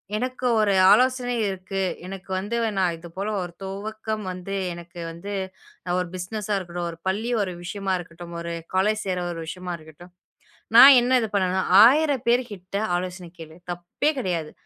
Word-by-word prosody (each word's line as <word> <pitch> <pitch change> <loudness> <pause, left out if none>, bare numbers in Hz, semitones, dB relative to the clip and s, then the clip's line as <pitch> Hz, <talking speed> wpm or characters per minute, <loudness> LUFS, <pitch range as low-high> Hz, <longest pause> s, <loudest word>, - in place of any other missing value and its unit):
எனக்கு 255 +2 -2
ஒரு 205 -2 +3 0.2
ஆலோசனை 250 +2 +3
இருக்கு. 190 0 -4 0.2
எனக்கு 195 +1 -9
வந்து 205 +5 -3 0.2
நான் 180 -3 +1
இது 170 - -11
போல 200 +3 -2
ஒரு 175 -1 -8
துவக்கம் 215 +2 -5
வந்து 185 +2 -6 0.2
எனக்கு 175 +1 -11
வந்து 180 +5 -7 0.6
ஒரு 180 - -1
பிஸ்னஷா 205 +3 -4
இருக்கட்டும், 175 -2 -4
ஒரு 165 - -8
பள்ளி 215 +6 -1
ஒரு 185 -3 -2
விஷயமா 195 +1 -3
இருக்கட்டும், 170 0 -10
ஒரு 170 0 -5 0.2
காலோஜ் 210 +3 +1
சேர்ற 180 -2 -1
ஒரு 165 - -7
விஷயமா 180 +1 -5
இருக்கட்டும் 160 +3 -15 0.6
நான் 265 +3 +11
என்ன 255 +1 +3
இது 220 - -2
பண்ணும்னா, 190 -1 +1 0.2
1000 285 0 +3
பேருகிட்ட 215 -6 0 0.2
ஆலோசன 180 -1 -6
கேளு. 160 0 -11
தப்பே 175 - -1
கிடையாது. 170 -8 -2
190 Hz, 155 wpm, -24 LUFS, 175-215 Hz, 0.6 s, நான்